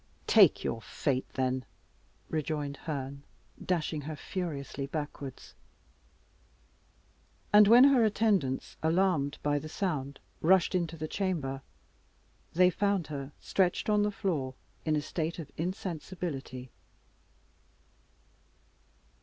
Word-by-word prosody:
"Take - - +6
your 115 - -2
fate, 130 +2 -2
then!" 130 0 0 0.6
rejoined 150 -2 -2
Herne, 140 -2 -5 0.4
dashing 160 -4 -1
her 155 +2 -5
furiously 145 -5 -4
backwards. 145 -2 -6 2.0
And 210 0 +9
when 240 +4 +9
her 270 -4 +6
attendants, 205 -11 +1
alarmed 160 -4 +2
by 145 0 +2
the 155 - -8
sound, 145 -7 -2 0.2
rushed 185 +2 +4
into 170 -3 -1
the 155 0 -4
chamber, 155 -9 -2 0.9
they 180 +2 +5
found 200 -2 +1
her 140 0 -5
stretched 190 +2 +1
on 210 0 +4
the 210 - +2
floor 160 -11 -2 0.3
in 155 -1 +2
a 150 - +1
state 160 +1 -3
of 160 -4 -7
insensibility. 160 -7 -4
155 Hz, 105 wpm, -30 LUFS, 140-185 Hz, 2.0 s, And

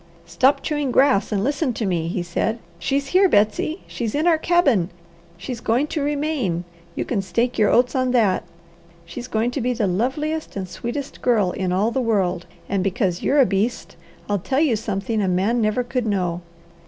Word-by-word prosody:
"Stop 275 +2 +2
chewing 295 -3 -1
grass 260 -7 +3
and 200 -2 0
listen 285 0 0
to 220 - -3
me," 170 -4 -1
he 175 +1 -2
said. 220 +5 -1 0.2
"She's 275 +10 -1
here, 375 +1 +4
Betsy! 215 - +1
She's 230 -1 -4
in 305 +3 +1
our 330 -2 +4
cabin. 280 - +2 0.5
She's 230 +6 -6
going 235 +6 +1
to 310 - -1
remain, 285 - -1 0.3
you - - -2
can 215 -5 -1
stake 235 +6 -1
your 210 - +4
oats 245 +1 +3
on 255 -1 +1
that. 220 -7 +2 0.6
She's 240 +9 -7
going 225 +1 0
to 270 - -3
be 250 +1 0
the 230 -3 0
loveliest 270 - -2
and 190 -2 -4
sweetest 255 +8 -6
girl 215 -7 +2
in 185 -1 -2
all 200 +5 +1
the 265 - 0
world, 185 -7 0 0.2
and 195 -2 0
because 195 -3 0
you're 285 - +2
a - - +6
beast, 210 +3 -2 0.3
I'll 205 -1 0
tell 265 +9 -1
you 295 -7 +3
something 210 0 -2
a 195 - 0
man 195 +7 +1
never 215 +3 +1
could 245 -1 -2
know. 180 -4 -1
230 Hz, 190 wpm, -22 LUFS, 195-270 Hz, 0.6 s, a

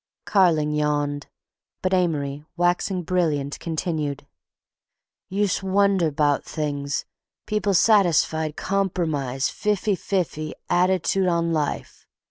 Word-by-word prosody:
Carling 165 -7 +3
yawned, 145 -1 -1 0.6
but 185 0 +1
Amory, 150 -6 0
waxing 175 +1 +1
brilliant, 155 -5 0
continued: 155 -4 -3 1.0
"Use' 200 +1 0
wonder 195 -3 +2
'bout 145 -1 +1
things—people 150 +7 -3
satisfied 160 -6 +3
compromise, 160 -9 -1
fif'y 210 -1 0
fif'y 170 -5 -2 0.2
att'tude 185 +1 +2
on 170 -1 +1
life. 150 -2 -3
170 Hz, 90 wpm, -23 LUFS, 150-190 Hz, 1.0 s, Carling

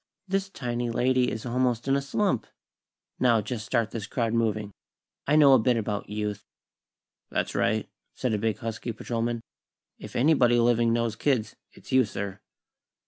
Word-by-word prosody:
This 195 +1 -1
tiny 120 -7 -3
lady 125 +2 +2
is 110 - -5
almost 125 0 0
in 135 - +3
a 140 - +1
slump. 140 - 0 0.7
Now, 120 -3 +4
just 110 +1 -4
start 115 -2 0
this 110 -3 -5
crowd 115 -1 -1
moving. 110 -3 0 0.6
I 150 - +3
know 145 -3 +7
a 130 - +7
bit 120 +2 +2
about 105 -2 -3
Youth." 105 -1 -3 0.9
"That's - - -2
right," - - +1 0.3
said 125 -3 -1
a 105 - 0
big, 110 0 0
husky 115 0 -4
patrolman. 115 +1 -2 0.6
"If - - -10
anybody 125 -3 +4
living 120 -1 +3
knows 115 -1 0
kids, 125 -4 0 0.2
it's - - -14
you, 130 0 +5
sir." 100 -2 -5
120 Hz, 160 wpm, -27 LUFS, 110-130 Hz, 0.9 s, know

